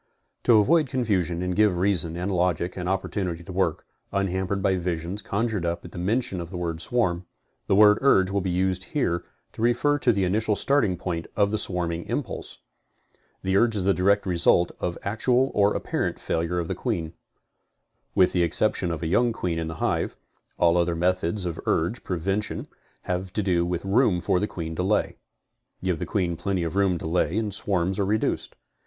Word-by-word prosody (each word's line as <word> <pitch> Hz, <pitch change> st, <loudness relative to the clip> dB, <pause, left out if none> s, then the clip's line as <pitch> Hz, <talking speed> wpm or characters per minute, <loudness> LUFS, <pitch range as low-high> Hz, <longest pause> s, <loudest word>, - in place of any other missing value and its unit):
To 115 Hz, -, +6 dB
avoid 150 Hz, +8 st, +4 dB
confusion 95 Hz, -, 0 dB
and 90 Hz, 0 st, -2 dB
give 105 Hz, -4 st, +3 dB
reason 85 Hz, -3 st, 0 dB
and 90 Hz, +3 st, -2 dB
logic 90 Hz, -1 st, 0 dB
an 90 Hz, -1 st, -4 dB
opportunity 95 Hz, -2 st, -2 dB
to 90 Hz, -, -9 dB
work, 90 Hz, -4 st, 0 dB, 0.3 s
unhampered 95 Hz, 0 st, -1 dB
by 95 Hz, -2 st, +3 dB
visions 90 Hz, +2 st, -3 dB
conjured 105 Hz, -2 st, -1 dB
up 85 Hz, +1 st, -2 dB
at 90 Hz, -, -11 dB
mention 95 Hz, +1 st, -1 dB
of 85 Hz, -, -7 dB
the 90 Hz, -, -6 dB
word 85 Hz, -1 st, -3 dB
swarm, 90 Hz, -6 st, 0 dB, 0.4 s
the -, -, +3 dB
word 105 Hz, +1 st, +6 dB
urge 95 Hz, -9 st, +4 dB
will 100 Hz, 0 st, 0 dB
be 95 Hz, -, -2 dB
used 95 Hz, +1 st, 0 dB
here 85 Hz, -12 st, +1 dB, 0.3 s
to -, -, -8 dB
refer 120 Hz, +5 st, +2 dB
to 125 Hz, -, +3 dB
the 100 Hz, -3 st, 0 dB
initial 105 Hz, +3 st, +1 dB
starting 130 Hz, -10 st, +2 dB
point 85 Hz, -2 st, -4 dB
of 100 Hz, -1 st, +2 dB
the 110 Hz, -, 0 dB
swarming 85 Hz, -3 st, -1 dB
impulse. -, -, -4 dB, 0.9 s
The 95 Hz, 0 st, 0 dB
urge 115 Hz, +2 st, +3 dB
is 100 Hz, -, -1 dB
the 100 Hz, +1 st, +3 dB
direct 100 Hz, +3 st, +2 dB
result 85 Hz, -1 st, +3 dB
of 85 Hz, -1 st, -2 dB
the -, -, -8 dB
actual 125 Hz, +5 st, +2 dB
or 100 Hz, 0 st, +3 dB
apparent -, -, -2 dB
failure 85 Hz, +2 st, -1 dB
of 85 Hz, -2 st, -1 dB
the -, -, -2 dB
queen. 85 Hz, -10 st, -3 dB, 1.0 s
With 90 Hz, -, +5 dB
the 90 Hz, -, +1 dB
exception 90 Hz, +1 st, +1 dB
of 85 Hz, -1 st, -4 dB
a -, -, -1 dB
young 120 Hz, +8 st, +3 dB
queen 90 Hz, -7 st, -2 dB
in 80 Hz, -, -3 dB
the 80 Hz, -, -5 dB
hive, -, -, -1 dB, 0.4 s
all 85 Hz, 0 st, +4 dB
other 85 Hz, -1 st, +1 dB
methods 90 Hz, +2 st, 0 dB
of 85 Hz, -2 st, -4 dB
urge 90 Hz, +9 st, 0 dB
prevention 95 Hz, +4 st, -2 dB, 0.4 s
have 90 Hz, +1 st, -3 dB
to 105 Hz, -, 0 dB
do 85 Hz, -3 st, +1 dB
with 90 Hz, +1 st, -3 dB
room 100 Hz, -2 st, +3 dB
for 90 Hz, +1 st, +1 dB
the 105 Hz, -, -1 dB
queen 80 Hz, -4 st, -5 dB
to -, -, 0 dB
lay. 100 Hz, +3 st, 0 dB, 0.7 s
Give 90 Hz, -4 st, 0 dB
the -, -, -4 dB
queen 90 Hz, -5 st, -1 dB
plenty 90 Hz, +1 st, -1 dB
of 80 Hz, +1 st, -3 dB
room 95 Hz, -3 st, +2 dB
to -, -, -8 dB
lay 85 Hz, +3 st, 0 dB
and 110 Hz, -3 st, -1 dB
swarms 95 Hz, -1 st, 0 dB
are 100 Hz, -, +2 dB
reduced. 110 Hz, +2 st, -1 dB
95 Hz, 195 wpm, -25 LUFS, 85-105 Hz, 1.0 s, To